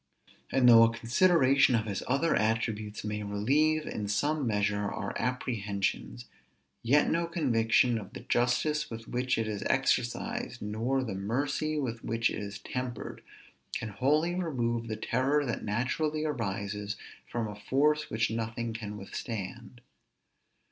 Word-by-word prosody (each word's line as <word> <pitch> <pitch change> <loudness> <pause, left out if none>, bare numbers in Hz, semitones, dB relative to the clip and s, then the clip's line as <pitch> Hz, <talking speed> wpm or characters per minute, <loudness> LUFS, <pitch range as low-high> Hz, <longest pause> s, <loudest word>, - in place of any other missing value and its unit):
And 130 -2 +4
though 115 -1 +9
a 115 0 +6
consideration 135 +2 +4
of 110 -1 +1
his 100 -3 -3
other 140 +6 +2
attributes 110 -1 -1
may 105 0 -3
relieve, 140 +10 +1
in 105 -1 -4
some 145 +6 0
measure, 105 -1 0
our - - -4
apprehensions; 115 -2 -2 0.6
yet 140 +6 +4
no 170 0 +1
conviction 120 -7 +2
of 100 - -10
the - - -7
justice 150 +5 +1
with 115 -1 -8
which 125 +1 0
it 115 -1 0
is 105 -2 -3
exercised, - - 0
nor 115 +6 -1
the 110 -6 -4
mercy 140 +10 -1
with 120 -5 -3
which 115 0 +1
it - - -4
is 100 -1 -5
tempered, 125 -1 -5 0.5
can 110 - -3
wholly 150 - +1
remove 120 -10 -1
the 110 -1 -3
terror 140 +4 +1
that 120 - -3
naturally 150 +8 -1
arises 105 -6 -3 0.3
from 115 -2 -2
a 105 - -6
force 145 +8 +1
which 110 0 0
nothing 115 0 -3
can 105 -2 -6
withstand. 115 +3 -6
115 Hz, 140 wpm, -30 LUFS, 105-135 Hz, 0.6 s, though